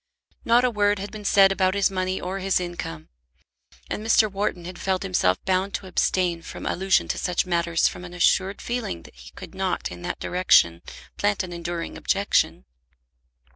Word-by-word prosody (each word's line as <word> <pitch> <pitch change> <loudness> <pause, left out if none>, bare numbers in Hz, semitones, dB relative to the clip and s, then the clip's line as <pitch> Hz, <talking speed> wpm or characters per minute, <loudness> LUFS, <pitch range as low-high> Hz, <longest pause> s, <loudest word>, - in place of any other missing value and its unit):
Not 235 +2 +4
a 250 - +2
word 205 -1 +2
had 200 +1 -6
been 215 -1 -8
said 195 -1 +6
about 190 0 +1
his 200 -1 +2
money 185 0 -1
or 185 +2 -4
his 195 0 +1
income. 175 - -6 0.8
And 210 - -4
Mr. 220 -1 +4
Wharton 195 -3 -2
had 180 0 -8
felt 190 -1 -1
himself 135 - +2
bound 190 +1 0
to - - -5
abstain 180 -1 0
from - - -9
allusion 190 +1 +1
to - - -1
such 180 0 0
matters 170 -2 +1
from 180 - -6
an 180 0 -9
assured 190 +2 +2
feeling 235 - -3
that - - -15
he - - -13
could - - -10
not - - -2
in 90 0 -9
that - - -4
direction 85 - +3 0.4
plant 205 -1 +1
an 175 -1 -7
enduring 170 0 -5
objection. 60 - +1
185 Hz, 180 wpm, -24 LUFS, 175-195 Hz, 0.8 s, said